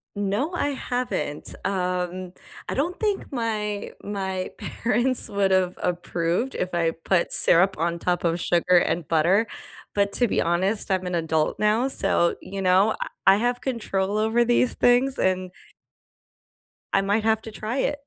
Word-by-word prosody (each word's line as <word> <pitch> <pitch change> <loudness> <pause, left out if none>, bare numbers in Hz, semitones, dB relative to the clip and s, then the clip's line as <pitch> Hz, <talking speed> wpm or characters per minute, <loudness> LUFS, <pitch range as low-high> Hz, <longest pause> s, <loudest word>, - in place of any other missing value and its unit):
No, 205 - -1
I 290 -5 -1
haven't, 245 - -4
um, 180 -1 -2 0.3
I - - -2
don't 340 +6 -2
think 415 -8 -2
my 210 -4 -3
my 190 -2 -3
parents 245 +2 0
would've 190 -2 +1
approved 175 +6 -1
if 180 -1 -3
I 165 -1 +1
put 170 +2 -1
syrup 190 +3 +6
on 170 +1 -1
top 175 +1 -1
of 170 0 0
sugar 175 +1 +2
and 170 -2 +1
butter, 180 +7 +3 0.5
but 200 -1 +1
to 245 -3 +2
be - - +1
honest, 190 +5 0
I'm 185 -1 0
an 180 - -3
adult 160 -2 0
now, 215 +5 +2
so, 170 -9 +1
you 195 +2 -6
know, 190 +3 +4
uh, - - -3 0.3
I 195 - +7
have 245 +3 -1
control 210 -5 -2
over 220 +2 +2
these 240 +1 +2
things 255 +3 +2
and 185 -1 0 1.4
I - - +4
might 205 +3 0
have 220 0 +1
to 225 - -8
try 220 +4 -4
it. 285 +2 -1
195 Hz, 155 wpm, -24 LUFS, 180-230 Hz, 1.4 s, I